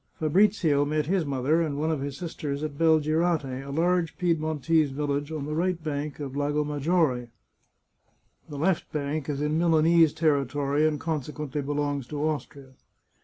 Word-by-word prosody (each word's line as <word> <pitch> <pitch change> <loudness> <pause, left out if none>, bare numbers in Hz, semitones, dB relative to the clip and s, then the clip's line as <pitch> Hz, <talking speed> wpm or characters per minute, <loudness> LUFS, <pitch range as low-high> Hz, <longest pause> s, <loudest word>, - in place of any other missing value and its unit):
Fabrizio 160 -3 +3
met 150 +1 0
his 175 -2 0
mother 140 +4 +1
and 150 -4 -2
one 155 +2 0
of 150 -4 -2
his 140 -1 -4
sisters 150 -4 -4
at 150 -2 -4
Bel 160 +1 +4
girate, 155 -4 0
a 140 - -9
large 165 +1 0
Piedmontese 160 -2 +1
village 145 +1 -2
on 155 -3 -4
the 150 - -4
right 170 +1 -1
bank 150 -1 -4
of 140 -3 -5
the 140 - -3
Lago 145 +1 0
Maggiore. 145 -4 0 1.2
The 145 - -7
left 170 +4 0
bank 150 0 -3
is 145 0 -2
in 150 +2 0
Milanese 165 -1 +4
territory, 145 -1 +1
and 150 -2 -1
consequently 150 -2 -3
belongs 145 -2 -2
to 150 - -6
Austria. 140 -3 -5
150 Hz, 165 wpm, -26 LUFS, 140-160 Hz, 1.2 s, Bel